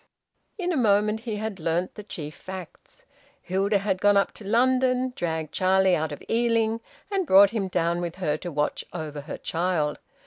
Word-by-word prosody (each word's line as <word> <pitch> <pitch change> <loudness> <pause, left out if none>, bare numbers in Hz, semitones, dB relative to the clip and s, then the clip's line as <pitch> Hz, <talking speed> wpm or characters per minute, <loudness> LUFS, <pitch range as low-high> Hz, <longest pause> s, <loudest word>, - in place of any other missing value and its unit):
In 360 -3 -1
a - - 0
moment 210 -2 +3
he 225 -2 -4
had 210 -2 -4
learnt 165 +3 -1
the - - -8
chief 155 -7 -7
facts. 185 +2 -10 0.3
Hilda 195 +3 +1
had 195 -1 -1
gone 205 0 +5
up 200 - +2
to - - -11
London, 255 +3 +2
dragged 160 -3 -3
Charlie 190 0 +3
out 155 0 -2
of 145 - -8
Ealing, 230 -1 +1 0.3
and 385 -4 0
brought 195 +1 +7
him 210 -4 -1
down 170 -1 0
with 175 -1 -4
her 175 -5 -1
to 175 +2 -6
watch 150 0 -1
over 155 -4 -5
her 150 - -7
child. 165 -3 -1
190 Hz, 180 wpm, -26 LUFS, 170-220 Hz, 0.3 s, brought